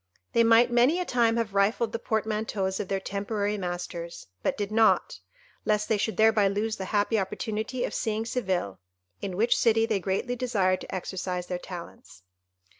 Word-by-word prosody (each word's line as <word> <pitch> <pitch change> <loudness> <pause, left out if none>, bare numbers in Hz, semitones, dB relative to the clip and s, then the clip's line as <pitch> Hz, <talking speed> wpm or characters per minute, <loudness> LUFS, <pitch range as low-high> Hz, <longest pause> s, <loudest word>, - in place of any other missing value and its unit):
They 230 - +5
might 230 +1 +5
many 250 +8 +4
a 360 - -1
time 235 -4 +2
have 225 -3 -1
rifled 210 +3 +2
the 230 - -3
portmanteaus 215 -3 -1
of - - -3
their 195 0 -1
temporary 205 +2 -2
masters, 175 -2 -5 0.2
but - - -1
did 205 0 -3
not, 220 0 +3 0.4
lest 210 0 +1
they 220 - +3
should 220 - -1
thereby 220 -2 +5
lose 210 +3 -1
the 190 - -4
happy 210 +2 +1
opportunity 220 +5 -3
of - - -5
seeing 220 -1 -1
Seville, 185 - -2 0.4
in 190 -2 -4
which 230 +3 +3
city 225 -1 +3
they 215 -3 0
greatly 195 +6 -1
desired 205 -7 +1
to - - -6
exercise 180 -1 -3
their 180 0 -4
talents. 170 - -10
210 Hz, 175 wpm, -27 LUFS, 190-225 Hz, 0.4 s, They